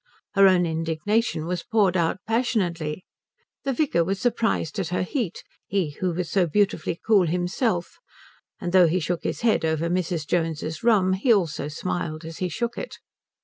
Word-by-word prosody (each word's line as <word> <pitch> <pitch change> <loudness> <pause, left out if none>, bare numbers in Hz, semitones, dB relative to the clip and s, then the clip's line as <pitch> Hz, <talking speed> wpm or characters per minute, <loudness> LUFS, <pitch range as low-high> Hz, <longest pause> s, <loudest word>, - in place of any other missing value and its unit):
Her 195 -1 +7
own 180 -2 +4
indignation 165 +3 -1
was 175 0 -2
poured 205 -5 +2
out 170 -2 +1
passionately. 185 -9 -1 0.6
The 275 - +1
vicar 250 - +2
was 195 +3 -2
surprised 225 -6 0
at 190 - -1
her 180 +2 -1
heat, 210 - -3 0.2
he 190 -6 0
who 180 +5 -2
was 175 0 -3
so 180 0 +2
beautifully 170 -2 0
cool 200 -6 +4
himself, 180 +3 -1 0.6
and 175 - -3
though 185 -2 +7
he 175 +3 +1
shook 175 +1 -2
his - - -3
head 230 -6 +2
over 160 +1 0
Mrs. 175 -3 -1
Jones's 160 -1 -2
rum 200 -5 +4
he 205 +7 +2
also 175 -9 +1
smiled 155 0 -4
as 165 0 -8
he 185 - -1
shook 235 +7 -3
it. - - -7
180 Hz, 170 wpm, -24 LUFS, 165-205 Hz, 0.6 s, Her